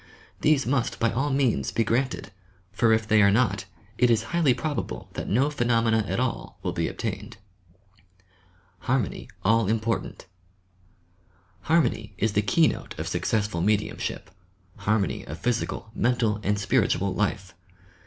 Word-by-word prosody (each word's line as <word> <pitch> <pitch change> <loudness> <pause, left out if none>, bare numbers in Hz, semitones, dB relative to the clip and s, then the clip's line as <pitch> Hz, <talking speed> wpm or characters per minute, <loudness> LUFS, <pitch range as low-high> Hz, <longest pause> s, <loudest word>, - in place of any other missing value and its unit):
These 150 -3 +3
must 125 -1 0
by 115 -1 +2
all 140 +4 0
means 130 - +1
be 115 - +1
granted, 120 0 -1 0.4
for 115 +3 +2
if 110 0 +2
they 110 -1 +5
are 100 - +6
not, 100 -2 +1 0.3
it 125 - +5
is 115 -1 +3
highly 170 -6 +4
probable 150 +3 -3
that - - -5
no 130 +9 +2
phenomena 115 -4 +2
at - - -1
all 130 -1 -3
will - - -1
be - - -1
obtained. - - -5 1.4
HARMONY - - -1 0.2
ALL 115 0 +3
IMPORTANT 115 +2 -2 1.4
Harmony 120 -10 +1
is 105 +3 0
the 105 - +3
keynote 155 - +1
of - - -4
successful 105 -5 -1
mediumship, 105 +2 -1 0.2
— 95 -2 -36
harmony 105 -5 +1
of 75 - -6
physical, 115 -1 -2
mental 115 -4 +1
and 105 +1 0
spiritual 100 -1 +1
life. 100 -2 -2
115 Hz, 140 wpm, -26 LUFS, 105-125 Hz, 1.4 s, are